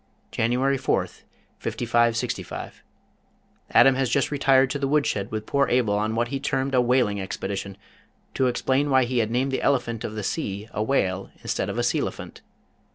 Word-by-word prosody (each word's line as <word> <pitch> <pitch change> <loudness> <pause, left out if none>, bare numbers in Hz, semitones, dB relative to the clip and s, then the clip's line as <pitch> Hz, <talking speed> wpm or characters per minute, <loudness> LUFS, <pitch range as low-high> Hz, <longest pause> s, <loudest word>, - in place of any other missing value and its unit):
January 130 +4 +1
4th, 130 - -2 0.3
5565. 115 -1 -1 0.9
Adam 135 - +6
has 130 -1 0
just 140 +3 +1
retired 135 -2 +3
to 145 - -2
the 140 - 0
wood 150 +1 +2
shed 100 -1 -2
with 110 0 -4
poor 140 +2 +1
Abel 120 -4 +2
on 110 +2 -1
what 120 +1 0
he 140 - -3
termed 135 0 -1
a 125 - +4
"whaling 120 -5 +2
expedition," 95 0 -5 0.6
to 130 - +1
explain 130 +3 +1
why 130 -1 +4
he 125 0 0
had 110 -2 +1
named 130 +3 0
the 130 - -1
elephant 120 -5 0
of 110 - -5
the 105 - -4
sea 100 -4 -3
a - - -2
whale 100 -6 0
instead - - -2
of - - -4
a - - +1
sealephant. - - -2
125 Hz, 175 wpm, -24 LUFS, 110-135 Hz, 0.9 s, Adam